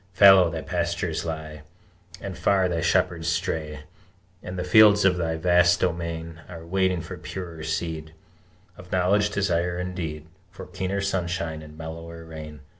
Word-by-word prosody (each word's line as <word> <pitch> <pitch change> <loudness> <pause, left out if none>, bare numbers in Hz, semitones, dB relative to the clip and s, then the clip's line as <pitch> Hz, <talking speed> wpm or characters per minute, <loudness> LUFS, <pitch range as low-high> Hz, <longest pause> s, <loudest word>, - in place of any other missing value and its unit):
Fallow 95 -2 +7
thy 80 -1 -4
pastures 85 -1 -2
lie, 80 -2 -5 0.6
And - - -6
far 95 -2 +2
thy 85 -2 -1
shepherds 85 -1 +1
stray, 80 -4 -2 0.6
And 90 +1 -7
the 90 - -2
fields 105 +2 +6
of 95 -2 +5
thy 85 -2 -1
vast 90 +1 +4
domain 85 -2 -3
Are 85 -2 -9
waiting 95 0 +1
for 85 - -8
purer 85 -4 -7
seed 80 0 -4 0.6
Of - - -13
knowledge, 100 +3 +2
desire, 90 -3 0
and 90 0 -4
deed, 80 -4 -5 0.2
For - - -10
keener 95 +2 -3
sunshine 85 -5 -2
and 75 0 -13
mellower 80 +1 -8
rain! 75 -2 -9
85 Hz, 150 wpm, -25 LUFS, 80-90 Hz, 0.6 s, Fallow